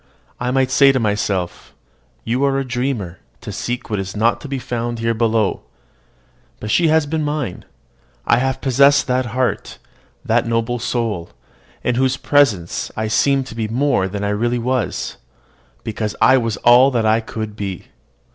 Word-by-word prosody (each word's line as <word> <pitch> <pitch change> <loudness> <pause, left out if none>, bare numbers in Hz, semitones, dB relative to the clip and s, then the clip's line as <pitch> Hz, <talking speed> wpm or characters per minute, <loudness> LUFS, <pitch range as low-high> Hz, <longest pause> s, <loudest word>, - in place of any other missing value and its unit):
I 125 - -1
might 130 0 +1
say 140 0 +6
to 130 - 0
myself, 105 -5 -2 0.5
"You 125 +4 -1
are 135 -1 +1
a 135 - -1
dreamer 120 -8 -3 0.2
to - - -7
seek 120 0 -4
what 105 -2 -2
is 95 +1 -5
not 115 +2 +2
to - - -7
be 135 -1 -3
found 120 -1 -3
here 115 0 0
below." 110 -2 +1 1.0
But 105 - -4
she 170 - +3
has 160 -1 +3
been 155 +1 -2
mine. 145 -11 -3 0.6
I 120 - +4
have 130 +1 -1
possessed 140 +2 +4
that 130 -1 0
heart, 125 +2 -2 0.5
that - - +1
noble 115 +1 -1
soul, 115 -8 -2 0.5
in 125 - +1
whose 130 -1 +1
presence 110 - +1
I 110 0 -1
seemed 135 +4 +2
to 115 - -10
be 110 -1 -2
more 120 -4 +1
than 100 +1 -5
I 100 - 0
really 120 +4 0
was, 125 0 -2 0.7
because 110 -1 -3
I 130 - +6
was 115 -4 0
all 125 +3 +7
that 120 -4 0
I 110 +1 +3
could 110 -1 -6
be. 100 -4 -6
120 Hz, 170 wpm, -19 LUFS, 110-130 Hz, 1.0 s, all